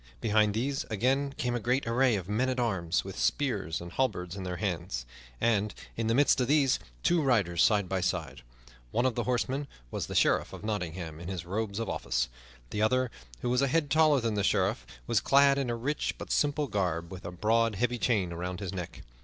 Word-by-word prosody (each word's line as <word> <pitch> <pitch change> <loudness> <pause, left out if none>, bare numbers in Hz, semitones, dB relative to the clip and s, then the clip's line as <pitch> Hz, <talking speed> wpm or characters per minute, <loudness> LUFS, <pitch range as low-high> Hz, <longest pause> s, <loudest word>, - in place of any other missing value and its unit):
Behind 105 - +2
these 135 +5 -1
again 130 +6 0
came 125 -5 -1
a 120 - 0
great 125 +4 0
array 120 +1 +3
of 95 -3 -4
men 115 +6 +1
at 130 0 -1
arms, 95 -8 0
with 95 0 -7
spears 105 - 0
and 85 0 -8
halberds 90 -9 -1
in 100 - -6
their 90 -1 -3
hands, 90 - -3 0.3
and, 105 -2 +1 0.2
in 115 -1 -1
the 115 - +2
midst 140 -1 +4
of 125 - +1
these, 140 -2 +3 0.2
two 175 -2 +3
riders 100 - +2
side 100 -3 +3
by 95 0 -1
side. 90 - -2 0.5
One 120 - +1
of 130 - +2
the 120 -1 -2
horsemen 130 +3 -1 0.2
was - - -3
the - - -6
Sheriff - - +3
of - - -9
Nottingham 90 -6 -4
in 85 - -8
his 90 -3 -4
robes 100 +2 -3
of 115 - -2
office. 60 0 -1 0.4
The 105 - -2
other, 130 +2 +2 0.3
who 120 - 0
was 125 +1 +2
a 140 - +3
head 145 +1 +1
taller 155 -3 +5
than 115 -2 -1
the 100 -1 0
Sheriff, - - +1 0.2
was - - +2
clad 140 0 +5
in 135 -3 -1
a 120 - 0
rich 135 +6 -2
but - - -7
simple 145 0 +2
garb, 90 - -2
with 95 -1 -8
a 85 - -5
broad, 110 +4 +2
heavy 120 +4 0
chain 100 -9 +1
about 90 +1 -4
his 100 -1 -4
neck. 90 -3 -6
110 Hz, 215 wpm, -29 LUFS, 90-130 Hz, 0.5 s, taller